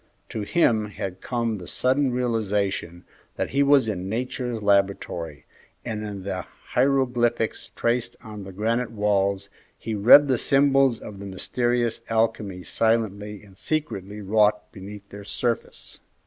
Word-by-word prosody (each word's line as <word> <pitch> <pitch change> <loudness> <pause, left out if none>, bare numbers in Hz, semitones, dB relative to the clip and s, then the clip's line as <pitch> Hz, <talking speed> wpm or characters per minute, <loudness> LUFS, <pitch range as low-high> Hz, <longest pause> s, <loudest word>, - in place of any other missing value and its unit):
To 110 - -4
him 110 -2 +2
had 95 -3 -6
come 115 -3 -1
the 90 -2 -9
sudden 130 +1 +1
realization 105 -7 -1 0.3
that - - -2
he 140 - +2
was 140 -3 +5
in 95 -3 -3
Nature's 120 0 -3
laboratory, 100 -6 0 0.4
and 110 -3 -3
in 100 -3 -6
the 95 -1 -3 0.3
hieroglyphics 125 -4 +1
traced 120 +1 0
on 105 -3 -8
the 95 - -9
granite 115 +5 -1
walls 100 -2 0 0.3
he 110 - -5
read 120 +8 +8
the 130 -4 +2
symbols 135 -3 +4
of 100 -2 -9
the 100 - -7
mysterious 120 +4 -1
alchemy 110 -4 0
silently 105 -2 0
and 100 -2 -17
secretly 105 -10 -3
wrought 105 +1 +2
beneath 100 +1 -10
their 100 0 -9
surface. 115 +3 -3
110 Hz, 135 wpm, -25 LUFS, 100-120 Hz, 0.4 s, read